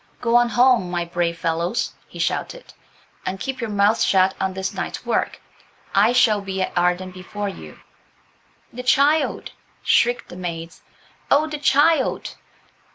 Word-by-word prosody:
"Go 235 Hz, 0 st, 0 dB
on 240 Hz, 0 st, +5 dB
home, 245 Hz, -6 st, +3 dB
my 175 Hz, -1 st, -2 dB
brave 170 Hz, 0 st, -2 dB
fellows," 170 Hz, +9 st, -1 dB
he -, -, -13 dB
shouted, -, -, -3 dB, 0.5 s
"and 190 Hz, +1 st, -4 dB
keep 265 Hz, +3 st, -4 dB
your 230 Hz, -, -3 dB
mouths 205 Hz, +1 st, +2 dB
shut 190 Hz, 0 st, +3 dB
on 190 Hz, -, 0 dB
this 190 Hz, 0 st, -3 dB
night's -, -, -5 dB
work. -, -, -1 dB, 0.5 s
I 205 Hz, +4 st, +4 dB
shall 220 Hz, -4 st, +3 dB
be 190 Hz, -1 st, -5 dB
at -, -, -5 dB
Arden 180 Hz, +1 st, +1 dB
before 200 Hz, +3 st, -5 dB
you–" 80 Hz, -, -11 dB, 0.9 s
"The 250 Hz, -, -6 dB
child!" 280 Hz, +5 st, +2 dB, 0.3 s
shrieked 245 Hz, +1 st, +2 dB
the -, -, -9 dB
maids; 170 Hz, -2 st, -6 dB, 0.5 s
"oh, 290 Hz, +2 st, +4 dB
the 305 Hz, -1 st, -5 dB
child!" 290 Hz, +1 st, +2 dB
200 Hz, 150 wpm, -22 LUFS, 180-250 Hz, 0.9 s, on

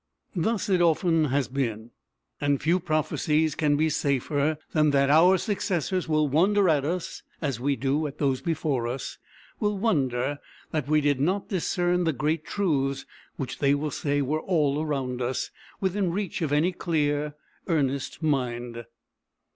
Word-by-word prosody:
Thus 210 Hz, +5 st, 0 dB
it 185 Hz, -3 st, +2 dB
often 165 Hz, -1 st, +3 dB
has 140 Hz, -1 st, 0 dB
been; 120 Hz, -4 st, -3 dB, 0.5 s
and 145 Hz, -1 st, +1 dB
few 170 Hz, +5 st, +2 dB
prophecies 155 Hz, -1 st, +1 dB
can 145 Hz, -1 st, +1 dB
be 155 Hz, +2 st, +2 dB
safer 145 Hz, +2 st, 0 dB, 0.2 s
than 155 Hz, -1 st, +4 dB
that 140 Hz, -1 st, +3 dB
our 175 Hz, +5 st, +6 dB
successors 185 Hz, -3 st, -1 dB
will 155 Hz, -1 st, +3 dB
wonder 190 Hz, +8 st, +3 dB
at 150 Hz, -3 st, +3 dB
us 170 Hz, +4 st, -3 dB, 0.2 s
as 140 Hz, -7 st, -2 dB
we 140 Hz, +2 st, +1 dB
do 140 Hz, +5 st, 0 dB
at 145 Hz, +1 st, -9 dB
those 135 Hz, -3 st, 0 dB
before 150 Hz, -7 st, -1 dB
us; 125 Hz, +2 st, -5 dB, 0.4 s
will 210 Hz, -1 st, 0 dB
wonder 140 Hz, -, 0 dB, 0.3 s
that 150 Hz, -4 st, -2 dB
we 155 Hz, 0 st, +3 dB
did 145 Hz, -2 st, +1 dB
not 185 Hz, +8 st, 0 dB
discern 180 Hz, -1 st, 0 dB
the 160 Hz, -, +2 dB
great 155 Hz, +3 st, -1 dB
truths 140 Hz, -9 st, 0 dB, 0.3 s
which 135 Hz, -, -5 dB
they 140 Hz, 0 st, +3 dB
will 150 Hz, +1 st, -2 dB
say 145 Hz, 0 st, 0 dB
were 155 Hz, +4 st, -1 dB
all 150 Hz, -5 st, +1 dB
around 135 Hz, -5 st, -2 dB
us, 125 Hz, +1 st, -2 dB, 0.3 s
within 190 Hz, -1 st, 0 dB
reach 195 Hz, -1 st, -3 dB
of 155 Hz, -3 st, -1 dB
any 155 Hz, +5 st, +3 dB
clear, 150 Hz, -4 st, -1 dB, 0.3 s
earnest 140 Hz, -3 st, -1 dB
mind. 120 Hz, -5 st, -1 dB
150 Hz, 155 wpm, -26 LUFS, 140-170 Hz, 0.5 s, our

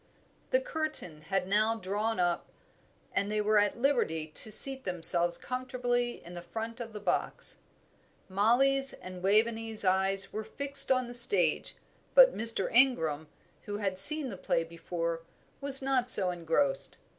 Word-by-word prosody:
The -, -, +1 dB
curtain 310 Hz, -, -5 dB
had 185 Hz, +3 st, -4 dB
now 215 Hz, +3 st, 0 dB
drawn 210 Hz, +2 st, -4 dB
up, 175 Hz, -1 st, -2 dB, 0.7 s
and 200 Hz, +1 st, -2 dB
they 215 Hz, -, -2 dB
were 210 Hz, 0 st, +1 dB
at 205 Hz, +1 st, -1 dB
liberty 235 Hz, -, -2 dB
to 155 Hz, +7 st, -2 dB
seat 265 Hz, +4 st, +3 dB
themselves 175 Hz, -1 st, +4 dB
comfortably 245 Hz, -1 st, -5 dB
in 175 Hz, -, -12 dB
the 175 Hz, -, -9 dB
front 225 Hz, +6 st, -8 dB
of 230 Hz, -2 st, -8 dB
the 210 Hz, -, -9 dB
box. 205 Hz, -, -4 dB, 0.7 s
Mollie's 265 Hz, +8 st, +1 dB
and 185 Hz, -1 st, -11 dB
Waveney's 220 Hz, +2 st, 0 dB
eyes 190 Hz, +1 st, 0 dB
were 215 Hz, -, -5 dB
fixed 275 Hz, +5 st, -4 dB
on 255 Hz, -1 st, 0 dB
the 240 Hz, -, -10 dB
stage, 195 Hz, -9 st, +5 dB, 0.4 s
but -, -, +6 dB
Mr. 230 Hz, 0 st, +1 dB
Ingram, 160 Hz, -, +1 dB, 0.4 s
who 205 Hz, 0 st, -6 dB
had 195 Hz, -3 st, +1 dB
seen 305 Hz, +3 st, +6 dB
the 195 Hz, -, -9 dB
play 165 Hz, -, -2 dB
before, 165 Hz, 0 st, -6 dB, 0.4 s
was 275 Hz, -1 st, +3 dB
not 260 Hz, -2 st, -1 dB
so 190 Hz, -7 st, +6 dB
engrossed. 175 Hz, -, -3 dB
215 Hz, 150 wpm, -28 LUFS, 180-255 Hz, 0.7 s, but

